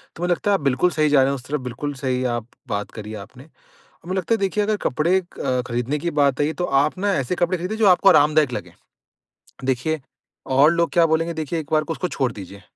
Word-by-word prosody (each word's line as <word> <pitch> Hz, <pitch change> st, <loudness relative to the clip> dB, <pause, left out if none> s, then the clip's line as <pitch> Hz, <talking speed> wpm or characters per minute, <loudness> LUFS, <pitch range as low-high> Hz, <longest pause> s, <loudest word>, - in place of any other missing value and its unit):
तो 175 Hz, -, -6 dB
मुझे 180 Hz, -, +1 dB
लगता 190 Hz, +4 st, +1 dB
है, -, -, +4 dB
आप 180 Hz, -, -2 dB
बिल्कुल 140 Hz, +5 st, +2 dB
सही 155 Hz, -2 st, +1 dB
जा 140 Hz, -2 st, +5 dB
रहे 135 Hz, -, +3 dB
हैं 140 Hz, -, -1 dB
उस 125 Hz, -, -9 dB
तरफ, 150 Hz, 0 st, -2 dB
बिल्कुल 125 Hz, +4 st, -5 dB
सही 130 Hz, -2 st, -2 dB
आप 120 Hz, 0 st, -5 dB, 0.2 s
बात 105 Hz, -3 st, -3 dB
करी 110 Hz, 0 st, -8 dB
आपने 130 Hz, 0 st, -15 dB, 0.6 s
और 170 Hz, -, -14 dB
मुझे 185 Hz, +1 st, -1 dB
लगता 190 Hz, +5 st, 0 dB
है, -, -, 0 dB
देखिए, 200 Hz, +1 st, 0 dB
अगर 215 Hz, 0 st, 0 dB
कपड़े 160 Hz, +8 st, +2 dB
अ, 130 Hz, -8 st, -3 dB
खरीदने 125 Hz, +5 st, -2 dB
की 170 Hz, +3 st, -2 dB
बात 140 Hz, -3 st, +1 dB
आई 145 Hz, -, +3 dB
है, 155 Hz, -, -1 dB
तो 180 Hz, -, -3 dB, 0.2 s
आप 155 Hz, +5 st, -3 dB
ना 200 Hz, +1 st, +1 dB
ऐसे 140 Hz, +3 st, -1 dB
कपड़े 175 Hz, +1 st, 0 dB
खरीदें, 180 Hz, +6 st, -4 dB
जो 220 Hz, -2 st, +2 dB
आपको 185 Hz, +1 st, +5 dB
आरामदायक 150 Hz, -4 st, +4 dB
लगें। 125 Hz, -, -6 dB, 0.9 s
देखिए, 135 Hz, +5 st, 0 dB, 0.5 s
और 140 Hz, +4 st, +4 dB
लोग 170 Hz, 0 st, +1 dB
क्या 170 Hz, -1 st, +5 dB
बोलेंगे, 165 Hz, +1 st, 0 dB
देखिए, 160 Hz, +1 st, -3 dB
एक 150 Hz, -, -7 dB
बार 155 Hz, -, +3 dB
उसको 180 Hz, -, -2 dB
छोड़ 130 Hz, -7 st, -1 dB
दीजिए। 100 Hz, 0 st, -10 dB
150 Hz, 245 wpm, -22 LUFS, 130-175 Hz, 0.9 s, जा